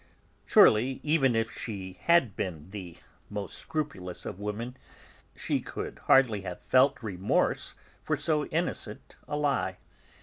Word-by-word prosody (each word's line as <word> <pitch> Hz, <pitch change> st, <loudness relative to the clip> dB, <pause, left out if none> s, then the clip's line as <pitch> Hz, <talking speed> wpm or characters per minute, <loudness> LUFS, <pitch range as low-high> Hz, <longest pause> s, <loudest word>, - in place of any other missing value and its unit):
Surely, 125 Hz, +5 st, +5 dB
even 145 Hz, -5 st, +3 dB
had 115 Hz, 0 st, +1 dB
she 95 Hz, -5 st, -6 dB, 0.4 s
been 85 Hz, -2 st, -4 dB
the 90 Hz, -5 st, -8 dB, 0.3 s
most 105 Hz, -1 st, -5 dB
scrupulous 95 Hz, -, -5 dB
of 100 Hz, -, -6 dB
women, 105 Hz, +4 st, -4 dB, 0.6 s
she -, -, -1 dB
could -, -, -6 dB
hardly 120 Hz, -7 st, +5 dB
have 90 Hz, -2 st, -6 dB
felt 130 Hz, 0 st, +3 dB
remorse 95 Hz, -2 st, 0 dB, 0.3 s
for -, -, -1 dB
so 150 Hz, -2 st, 0 dB
innocent 155 Hz, -10 st, -3 dB
a 145 Hz, -, -2 dB
lie. 140 Hz, -11 st, 0 dB
110 Hz, 125 wpm, -29 LUFS, 95-135 Hz, 0.6 s, Surely